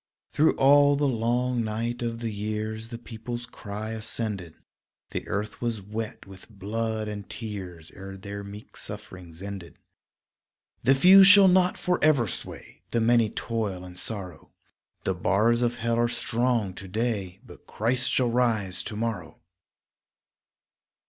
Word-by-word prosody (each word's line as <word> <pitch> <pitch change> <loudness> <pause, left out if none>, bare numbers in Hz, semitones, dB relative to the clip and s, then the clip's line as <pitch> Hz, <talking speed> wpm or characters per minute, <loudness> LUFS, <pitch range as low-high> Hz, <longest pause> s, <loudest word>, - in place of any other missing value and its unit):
Through 155 +2 +3
all 145 +1 +5
the 145 0 +1
long 120 0 0
night 115 +3 -3
of 115 -1 -3
the 115 -1 -2
years 110 +1 -4
The 115 0 -7
people's 120 +1 -6
cry 110 -1 -7
ascended; 105 -6 -2 0.6
The - - -4
earth 105 +1 -4
was 120 -3 -1
wet 105 +3 -6
with 95 +1 -13
blood 110 +2 -3
and 105 -1 -7
tears 95 -7 -7
Ere 95 0 -9
their 100 +1 -7
meek 100 +2 -11
sufferings 90 -1 -7
ended. 100 -4 -8 1.0
The 135 +3 +4
few 185 +7 +8
shall 200 0 +10
not 180 0 +3
forever 155 -8 +2
sway, 85 - -6
The 120 - 0
many 115 -1 +3
toil 105 -7 -3
in 90 -1 -11
sorrow, 95 -2 -6 0.5
The 95 - 0
bars 105 +7 +2
of 120 0 +1
hell 115 -1 -1
are 120 - +3
strong 120 -4 0
to 95 +1 -8
day 100 -3 -2
But - - -15
Christ 125 +4 0
shall 125 -3 +2
rise 110 -7 0
to 105 - -4
morrow. 105 -8 -4
110 Hz, 140 wpm, -26 LUFS, 100-120 Hz, 1.0 s, shall